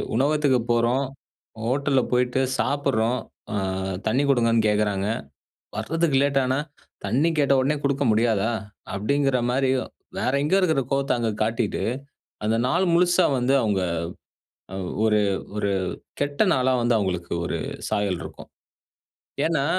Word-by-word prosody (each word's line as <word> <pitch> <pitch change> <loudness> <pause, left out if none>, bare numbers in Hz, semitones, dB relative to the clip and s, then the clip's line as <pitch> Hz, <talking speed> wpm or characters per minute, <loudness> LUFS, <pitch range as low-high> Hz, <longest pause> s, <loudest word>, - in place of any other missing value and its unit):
உணவகத்துக்கு 140 0 +2
போறோம் 120 +4 +2 0.6
ஹோட்டல்ல 135 +2 +2
போயிட்டு 125 +1 +2 0.2
சாப்பிடுறோம். 125 -4 +1 0.3
அ, - - -1 0.5
தண்ணி 130 +6 +2
குடுங்கன்னு 115 -4 +3
கேட்குறாங்க. 105 -2 +1 0.7
வர்றதுக்கு 155 +5 +1
லேட் 140 -1 +2
ஆனா, 130 +1 +1 0.5
"தண்ணி 135 +11 +2
கேட்ட 140 -2 +3
உடனே 145 +3 +1
குடுக்க 140 0 +1
முடியாதா?" 110 0 +2 0.4
அப்படிங்கிற 135 +6 +1
மாதிரியும், 130 0 +1 0.3
வேற - - +1
எங்கேயோ 185 +7 +3
இருக்கிற 160 -6 +2
கோவத்த 135 0 +1
அங்க 115 -2 0
காட்டிட்டு, 110 -1 -1 0.6
அந்த 110 +1 +2
நாள் 175 +8 +2
முழுசா 175 +1 +4
வந்து 130 +2 +2
அவங்க 100 -3 +1 0.9
அ, - - -4 0.3
ஒரு 105 -1 +4 0.4
ஒரு 100 -1 0 0.5
கெட்ட 145 +3 +1
நாளா 130 0 +2
வந்து 120 0 +2
அவங்களுக்கு 90 -4 -2
ஒரு - - -2 0.3
சாயல் 100 -4 0
இருக்கும். - - -10 1.0
ஏன்னா, 160 -4 +1
130 Hz, 125 wpm, -24 LUFS, 110-140 Hz, 1.0 s, முழுசா